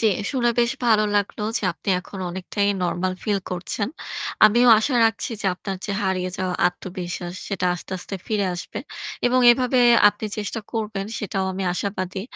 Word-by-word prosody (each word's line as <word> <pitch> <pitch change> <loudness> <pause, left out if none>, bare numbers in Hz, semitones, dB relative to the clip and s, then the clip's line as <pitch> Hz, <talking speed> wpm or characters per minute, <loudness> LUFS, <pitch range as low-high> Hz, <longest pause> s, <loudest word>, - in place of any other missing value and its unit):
জ্বী। 225 - +4 0.2
শুনে 245 -4 +2
বেশ 235 0 +2 0.2
ভালো 215 -2 +5
লাগলো 205 +1 -1 0.2
যে - - -11
আপনি 175 - -10
এখন 195 +2 -10
অনেকটাই 190 +3 -1
নরমাল 180 +1 -1
ফিল 205 -2 +1
করছেন। 180 +4 -2 0.6
আমিও 240 +4 +6
আশা 250 +4 0
রাখছি 225 +3 0
যে - - -1
আপনার 190 +1 -5
যে 200 - -2
হারিয়ে 185 -1 -1
যাওয়া 185 -1 -1
আত্মবিশ্বাস 180 -1 -5
সেটা 195 -3 -1
আস্তে, 180 +2 -8
আস্তে 185 - -6
ফিরে 210 -3 0
আসবে। 175 - -6 0.5
এবং 250 +1 +3
এভাবে 250 +1 +2 0.3
আপনি 205 +1 -5
চেষ্টা 210 +2 -3
করবেন 210 -3 -3
সেটাও 195 -2 -2
আমি 190 +1 -4
আশাবাদী। 190 0 -3
200 Hz, 165 wpm, -23 LUFS, 185-220 Hz, 0.6 s, আমিও